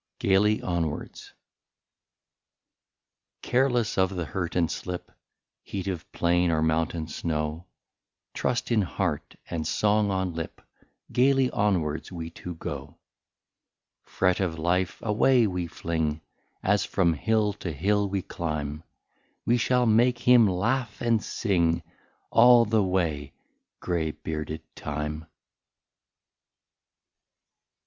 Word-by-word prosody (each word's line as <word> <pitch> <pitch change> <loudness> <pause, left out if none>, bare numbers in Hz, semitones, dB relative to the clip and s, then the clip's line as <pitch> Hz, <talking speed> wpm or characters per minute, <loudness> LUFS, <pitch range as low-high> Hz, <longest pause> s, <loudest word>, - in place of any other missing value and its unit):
13 - - -1
GAILY 105 +3 +4
ONWARDS. 85 -4 -3 2.1
Careless 125 -5 +1
of 95 0 +2
the 90 -2 -2
hurt 90 +1 -4
and 85 -3 +2
slip, 90 -1 -5 0.5
Heat 95 -1 -5
of 90 -4 -4
plain 85 +1 +2
or 80 -1 +1
mountain 80 0 0
snow, 75 +1 -3 0.7
Trust 125 0 -1
in 110 -2 +4
heart, 95 - -2
and 80 -2 -3
song 105 0 +2
on 95 -2 -1
lip. 80 0 -6 0.5
Gaily 135 0 +3
onwards 90 -8 0
we 85 -2 -6
two 90 -1 -8
go. - - -7 1.1
Fret 90 -1 +1
of 90 -4 -1
life 90 +3 0
away 115 +3 +4
we 90 -3 -2
fling. 80 -2 -2 0.4
As 100 0 +2
from 85 -4 +2
hill 105 +5 +1
to 90 - -3
hill 100 +7 +1
we 95 -1 -2
climb; 75 -2 -4 0.6
We 120 - +3
shall 125 +1 +2
make 120 +2 +4
him 120 -2 +6
laugh 110 +5 -1
and 115 -2 +1
sing 85 -7 0 0.5
All 120 0 +7
the 110 0 +2
way 80 -7 -1 0.5
grey 85 -3 -1
bearded 75 0 -5
time. 75 +2 -4
90 Hz, 115 wpm, -26 LUFS, 80-105 Hz, 2.1 s, All